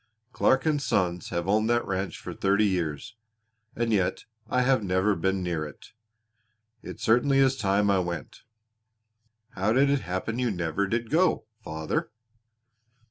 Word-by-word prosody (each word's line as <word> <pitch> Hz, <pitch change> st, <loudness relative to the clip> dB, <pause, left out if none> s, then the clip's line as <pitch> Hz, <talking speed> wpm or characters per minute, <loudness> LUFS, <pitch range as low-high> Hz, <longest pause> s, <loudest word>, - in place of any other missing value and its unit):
Clark 130 Hz, -, +3 dB
& 155 Hz, -2 st, +2 dB
Sons 90 Hz, -9 st, -1 dB
have 85 Hz, 0 st, -3 dB
owned 110 Hz, +3 st, +2 dB
that 120 Hz, 0 st, +2 dB
ranch 95 Hz, 0 st, -3 dB
for -, -, -7 dB
thirty 100 Hz, +2 st, +2 dB
years, 90 Hz, -, -2 dB, 0.6 s
and 115 Hz, -1 st, 0 dB
yet 95 Hz, -4 st, 0 dB, 0.2 s
I 125 Hz, +2 st, +2 dB
have 130 Hz, -3 st, +2 dB
never 95 Hz, +2 st, +2 dB
been 95 Hz, +2 st, -1 dB
near 85 Hz, -3 st, -2 dB
it. 75 Hz, -2 st, -11 dB, 0.9 s
It -, -, -9 dB
certainly 125 Hz, +5 st, +3 dB
is 135 Hz, -1 st, +4 dB
time 100 Hz, -2 st, +2 dB
I 95 Hz, -, +3 dB
went." 85 Hz, -4 st, -5 dB, 1.1 s
"How 95 Hz, +4 st, 0 dB
did 140 Hz, +3 st, +4 dB
it 140 Hz, -2 st, +1 dB
happen 95 Hz, +6 st, -3 dB
you 125 Hz, -1 st, +1 dB
never 90 Hz, 0 st, -1 dB
did 115 Hz, +2 st, -2 dB
go, 175 Hz, +4 st, +2 dB, 0.2 s
father?" 80 Hz, 0 st, -3 dB
100 Hz, 150 wpm, -27 LUFS, 90-120 Hz, 1.1 s, is